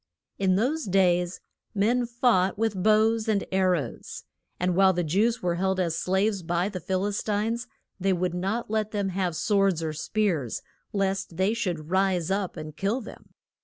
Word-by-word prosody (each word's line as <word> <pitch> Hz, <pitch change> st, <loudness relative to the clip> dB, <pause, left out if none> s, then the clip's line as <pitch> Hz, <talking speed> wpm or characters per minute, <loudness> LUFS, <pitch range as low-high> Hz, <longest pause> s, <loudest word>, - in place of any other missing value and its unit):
In 190 Hz, -1 st, +3 dB
those 275 Hz, +10 st, 0 dB
days 180 Hz, -2 st, +2 dB, 0.3 s
men 235 Hz, +5 st, +2 dB
fought 235 Hz, -6 st, +2 dB
with 215 Hz, -4 st, 0 dB
bows 220 Hz, +2 st, +3 dB
and 210 Hz, -2 st, +1 dB
ar 190 Hz, -1 st, +3 dB
rows. 140 Hz, -9 st, -5 dB, 0.4 s
And 180 Hz, 0 st, +1 dB
while 190 Hz, 0 st, +5 dB
the 175 Hz, 0 st, 0 dB
Jews 210 Hz, +9 st, +1 dB
were 175 Hz, -1 st, +1 dB
held 190 Hz, 0 st, +1 dB
as 170 Hz, -3 st, 0 dB
slaves 190 Hz, +3 st, 0 dB
by 175 Hz, +3 st, 0 dB
the 190 Hz, -3 st, -5 dB
Phil 185 Hz, +3 st, -1 dB
is 205 Hz, 0 st, -1 dB
tines 220 Hz, +3 st, -1 dB, 0.3 s
they 195 Hz, +1 st, +1 dB
would 180 Hz, -1 st, 0 dB
not 195 Hz, +6 st, -2 dB
let 215 Hz, -1 st, 0 dB
them 205 Hz, -2 st, -1 dB
have 185 Hz, -2 st, -1 dB
swords 195 Hz, -1 st, +2 dB
or 155 Hz, -1 st, -2 dB
spears, 165 Hz, -, -1 dB, 0.3 s
lest 195 Hz, -4 st, -1 dB
they 190 Hz, +3 st, +2 dB
should 175 Hz, -8 st, -3 dB
rise 190 Hz, -2 st, +1 dB
up 195 Hz, -2 st, -1 dB
and 155 Hz, -1 st, -7 dB
kill 200 Hz, +8 st, 0 dB
them. 230 Hz, -, -12 dB
190 Hz, 175 wpm, -26 LUFS, 180-215 Hz, 0.4 s, while